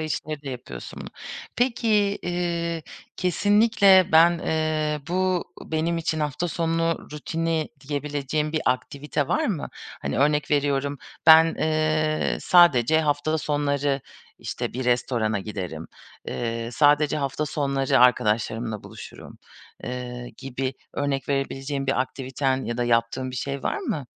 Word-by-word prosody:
içleri 155 Hz, -1 st, -4 dB
de 140 Hz, -, -5 dB
yapıyorsun 95 Hz, -, -8 dB
bunu. -, -, -7 dB, 0.5 s
Peki, 240 Hz, -2 st, +1 dB, 0.3 s
eee, 170 Hz, -2 st, -2 dB, 0.3 s
kesinlikle 200 Hz, 0 st, +4 dB
ben, 170 Hz, +2 st, +6 dB
eee, 155 Hz, -2 st, -1 dB
bu 185 Hz, 0 st, +1 dB, 0.2 s
benim 165 Hz, +2 st, -1 dB
için 160 Hz, -1 st, -1 dB
hafta 150 Hz, +4 st, -1 dB
sonu 165 Hz, 0 st, -1 dB
rutini 160 Hz, +1 st, -2 dB, 0.2 s
diyebileceğin 145 Hz, +1 st, -2 dB
bir 155 Hz, -, 0 dB
aktivite 140 Hz, +3 st, -1 dB
var 315 Hz, 0 st, +1 dB
mı? 180 Hz, -10 st, -2 dB, 0.3 s
Hani, 70 Hz, -, -2 dB
örnek 150 Hz, 0 st, +2 dB
veriyorum: 140 Hz, -1 st, +1 dB, 0.3 s
"Ben, 160 Hz, 0 st, +8 dB
eee, 155 Hz, 0 st, +1 dB
sadece 160 Hz, -5 st, +5 dB
hafta 150 Hz, +1 st, 0 dB
sonları, 145 Hz, -2 st, 0 dB, 0.4 s
işte, -, -, -4 dB
bir 130 Hz, +2 st, -4 dB
restorana 120 Hz, -3 st, +1 dB
giderim. 90 Hz, -6 st, -6 dB, 0.4 s
Eee, 115 Hz, -1 st, -3 dB
sadece 150 Hz, +2 st, +4 dB
hafta 145 Hz, +1 st, -2 dB
sonları 140 Hz, -2 st, +1 dB
arkadaşlarımla 115 Hz, -2 st, +2 dB
buluşurum." -, -, -11 dB, 0.5 s
Eee, 125 Hz, -1 st, -6 dB
gibi 135 Hz, 0 st, -4 dB, 0.2 s
örnek 140 Hz, -1 st, -2 dB
verebileceğin 135 Hz, 0 st, -2 dB
bir 135 Hz, -1 st, +1 dB
aktiviten 130 Hz, 0 st, -2 dB
ya 120 Hz, -, -3 dB
da 120 Hz, -, 0 dB
yaptığın 120 Hz, +2 st, 0 dB
bir 125 Hz, -, -6 dB
şey 140 Hz, +2 st, -3 dB
var -, -, -1 dB
mı? 145 Hz, -4 st, -3 dB
145 Hz, 125 wpm, -24 LUFS, 130-160 Hz, 0.5 s, Ben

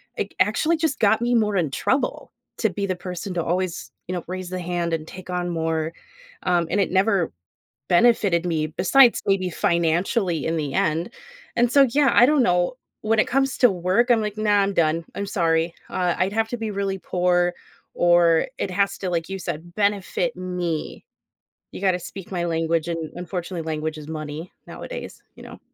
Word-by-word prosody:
It -, -, -4 dB
actually 330 Hz, +1 st, +2 dB
just 315 Hz, -2 st, -1 dB
got 220 Hz, -1 st, +4 dB
me 240 Hz, +1 st, +1 dB
more 210 Hz, -3 st, +2 dB
in 160 Hz, -6 st, 0 dB
trouble 260 Hz, -, -1 dB, 0.3 s
to 220 Hz, -, +1 dB
be 200 Hz, +2 st, -3 dB
the 185 Hz, -1 st, -1 dB
person 180 Hz, +1 st, -6 dB
to 170 Hz, -2 st, -1 dB
always, 180 Hz, +1 st, -2 dB, 0.2 s
you 180 Hz, -, -3 dB
know, 180 Hz, -, -3 dB
raise 185 Hz, 0 st, -5 dB
the 185 Hz, -, -3 dB
hand 175 Hz, -1 st, -2 dB
and 160 Hz, -1 st, -3 dB
take 185 Hz, +1 st, -11 dB
on 180 Hz, 0 st, -2 dB
more. 160 Hz, -1 st, -1 dB, 0.5 s
Um, 175 Hz, -2 st, +1 dB
and 205 Hz, -, 0 dB
it 195 Hz, -, +1 dB
never 190 Hz, -2 st, +2 dB, 0.6 s
benefited 190 Hz, -3 st, +3 dB
me, 160 Hz, -3 st, 0 dB
besides 230 Hz, -, +4 dB
maybe 195 Hz, -2 st, +1 dB
financially 170 Hz, +2 st, +1 dB
in 165 Hz, +1 st, 0 dB
the 145 Hz, -3 st, -3 dB
end. 160 Hz, +5 st, +1 dB, 0.5 s
And 240 Hz, 0 st, +3 dB
so, 280 Hz, -1 st, +7 dB
yeah, 285 Hz, +1 st, +3 dB
I 245 Hz, -, +7 dB
don't 295 Hz, -1 st, +3 dB
know. 180 Hz, -1 st, +2 dB, 0.3 s
When 220 Hz, +1 st, +1 dB
it -, -, +2 dB
comes 270 Hz, +1 st, +1 dB
to 245 Hz, -, +6 dB
work, 185 Hz, +7 st, +1 dB
I'm 235 Hz, -2 st, +5 dB
like, 210 Hz, -1 st, -3 dB
"Nah, 210 Hz, -1 st, +3 dB
I'm 195 Hz, 0 st, -1 dB
done. 165 Hz, 0 st, +1 dB
I'm 200 Hz, -, -3 dB
sorry." 165 Hz, -3 st, +1 dB, 0.2 s
Uh, 180 Hz, -1 st, 0 dB
I'd 185 Hz, +2 st, +1 dB
have 220 Hz, 0 st, +1 dB
to 245 Hz, -, -3 dB
be 225 Hz, -2 st, -4 dB
really 195 Hz, -1 st, -2 dB
poor, 175 Hz, -1 st, +1 dB, 0.4 s
or 175 Hz, -1 st, +4 dB
it -, -, -2 dB
has 200 Hz, +1 st, 0 dB
to 190 Hz, -, -3 dB
like 165 Hz, -2 st, -2 dB
you 195 Hz, 0 st, -4 dB
said, 170 Hz, -1 st, -6 dB
benefit 205 Hz, +4 st, 0 dB
me. 180 Hz, -3 st, -4 dB, 0.7 s
You -, -, -8 dB
gotta 185 Hz, -2 st, +2 dB
speak 190 Hz, +2 st, -9 dB
my 175 Hz, -1 st, -1 dB
language, 165 Hz, 0 st, 0 dB
and 165 Hz, -2 st, -4 dB
unfortunately, 175 Hz, -1 st, -5 dB
language 155 Hz, 0 st, -3 dB
is 150 Hz, -1 st, -9 dB
money 155 Hz, +1 st, -6 dB, 0.2 s
nowadays, -, -, -8 dB
you -, -, -13 dB
know? -, -, -11 dB
180 Hz, 190 wpm, -23 LUFS, 170-205 Hz, 0.7 s, so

